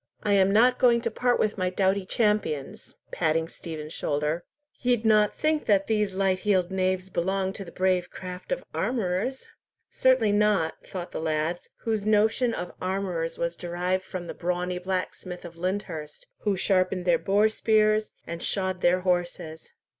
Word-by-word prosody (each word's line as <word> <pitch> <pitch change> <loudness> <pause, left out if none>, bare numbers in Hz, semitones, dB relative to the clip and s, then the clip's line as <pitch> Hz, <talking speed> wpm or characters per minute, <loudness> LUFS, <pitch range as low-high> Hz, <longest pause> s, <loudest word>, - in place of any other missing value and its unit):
I 205 - +2
am 195 -1 +5
not 240 +5 +4
going 240 -2 +5
to 230 -1 -2
part 245 +2 +1
with 210 -1 0
my 185 0 +1
doughty 190 +1 +1
champions!"—patting 165 - -1
Stephen's 155 -2 -7
shoulder. 150 +4 -1 0.4
"Ye'd 245 -3 +1
not 215 -1 +4
think 310 0 0
that 195 -2 +4
these 210 -3 0
light 190 -1 +1
heeled 190 -3 +1
knaves 185 0 0
belonged 190 +1 -1
to 195 - -7
the 170 - -10
brave 185 -1 +1
craft 180 - -8
of - - -1
armourers?" 230 +2 -1 0.5
"Certainly 255 -5 +3
not," 205 -5 +2
thought 180 -2 -6
the - - -4
lads, 160 +2 -1
whose 220 -3 -1
notion 220 +4 +3
of 180 -5 -5
armourers 185 -3 -2
was 170 0 -2
derived 180 +2 -2
from 185 -2 -6
the - - -6
brawny 180 0 -2
blacksmith 185 -1 -4
of 170 -1 -9
Lyndhurst, 170 -4 -4
who 205 -3 0
sharpened 185 -1 +1
their 170 -2 +4
boar 205 +2 +3
spears 215 0 +2
and 170 0 -6
shod 185 -2 -2
their 180 +1 +3
horses. 175 -3 -2
185 Hz, 160 wpm, -26 LUFS, 175-210 Hz, 0.5 s, am